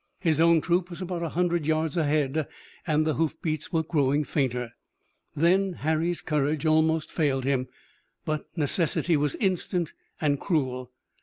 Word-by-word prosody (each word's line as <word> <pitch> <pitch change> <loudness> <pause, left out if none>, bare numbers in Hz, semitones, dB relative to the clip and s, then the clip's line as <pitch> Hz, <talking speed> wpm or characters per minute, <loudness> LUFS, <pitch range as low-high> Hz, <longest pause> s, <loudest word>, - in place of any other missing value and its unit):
His 160 -5 +1
own 165 -1 +5
troop 175 +2 +1
was 175 - -8
about 180 -2 -4
a 165 - -2
hundred 175 -2 0
yards 160 -1 0
ahead 150 -2 +1 0.4
and 155 -1 +2
the 155 - +1
hoofbeats 155 -1 -2
were 165 -2 +1
growing 145 -2 +1
fainter. 125 -5 -1 0.6
Then 185 +4 +3
Harry's 160 +2 -1
courage 150 +1 0
almost 160 0 +2
failed 140 -5 0
him, 130 -1 0 0.6
but 155 -1 -2
necessity 165 +2 +1
was 145 -1 0
instant 180 -3 -1 0.3
and 145 -3 +1
cruel. 130 -7 -1
155 Hz, 145 wpm, -27 LUFS, 145-170 Hz, 0.6 s, own